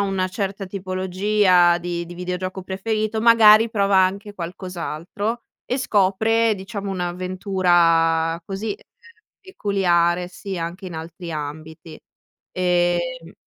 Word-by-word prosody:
una 195 -2 0
certa 195 0 -4
tipologia 185 -1 +2
di 170 -1 -4
di 175 - -10
videogioco 180 +1 -4
preferito, 215 +3 -2
magari, 225 -1 +7
prova 200 -2 +2
anche 200 +2 0
qualcos'altro 185 +4 -5 0.2
e 255 - -2
scopre, 220 0 +2
diciamo, 195 +1 -6
un'avventura 175 -3 +1
così, 195 +4 -5
uhm, - - -3 0.7
peculiare 180 - +1
sia 185 -1 -5
anche 175 +3 -7
in 175 - -7
altri 165 +2 -7
ambiti, 155 +2 -7 0.5
ehm 175 -1 0
185 Hz, 105 wpm, -22 LUFS, 175-200 Hz, 0.7 s, magari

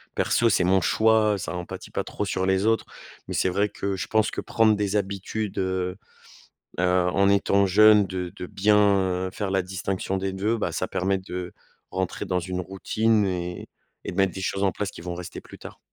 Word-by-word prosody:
perso, 115 -1 +2
c'est 90 - +3
mon 95 +2 +4
choix, 110 -1 +3
ça 80 -1 -5
en 90 0 -4
pâti - - -9
pas - - -2
trop - - -4
sur 95 -1 -1
les 95 +2 +1
autres. 115 0 +2 0.4
Mais - - -5
c'est 95 - +1
vrai 100 +3 +1
que 100 -1 -3
je - - -4
pense 110 -1 +2
que - - -4
prendre 110 -1 +3
des 105 0 -1
habitudes, 100 +1 -3
heu 95 -1 -1 0.8
heu, - - +1 0.3
en 100 0 +3
étant 100 0 +3
jeune, 105 +2 +6
de 90 -2 -5
de 90 - -6
bien, 105 +3 +2 0.5
heu, - - -8
faire 100 -3 -3
la 95 -1 +2
distinction 95 +1 -3
des 95 0 -2
2, 105 +4 0
bah, 90 -6 -2
ça 95 - -2
permet 95 +1 0
de 90 -1 -6 0.4
rentrer 95 -1 -2
dans 90 -1 0
une 90 +1 -4
routine 105 +4 +1
et 90 -1 -4 0.4
et - - -3
de 90 - -9
mettre 95 -2 +3
des 95 - -5
choses 100 +1 -1
en 95 - +3
place 100 -1 -3
qui - - -11
vont 90 0 -4
rester 90 -1 -7
plus - - -13
tard. - - -11
95 Hz, 215 wpm, -25 LUFS, 90-105 Hz, 0.8 s, jeune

